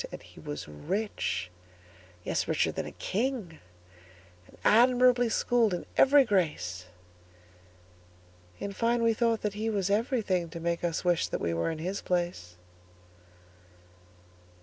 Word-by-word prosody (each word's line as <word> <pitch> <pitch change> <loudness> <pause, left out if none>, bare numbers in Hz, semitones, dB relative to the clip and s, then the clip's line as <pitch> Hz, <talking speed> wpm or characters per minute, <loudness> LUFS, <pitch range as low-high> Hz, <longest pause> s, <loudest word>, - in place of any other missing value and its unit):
And - - -9
he - - -15
was 75 0 -6
rich,—yes, 90 - -5
richer - - +1
than - - -4
a - - -7
king,—And 90 - -7
admirably 245 +1 +5
schooled 225 -3 +2
in - - -6
every 280 0 +6
grace:In 90 - -6
fine, 235 +3 +1
we 230 0 +4
thought 230 0 +1
that 210 -1 -1
he 215 +2 -2
was 200 -3 -1
everythingTo 200 -7 0
make 170 +1 -2
us 170 0 -2
wish 175 -2 +2
that - - -3
we 85 - -1
were 85 - 0
in 160 - -4
his 185 +5 -4
place. 175 - -2
165 Hz, 120 wpm, -29 LUFS, -, -, every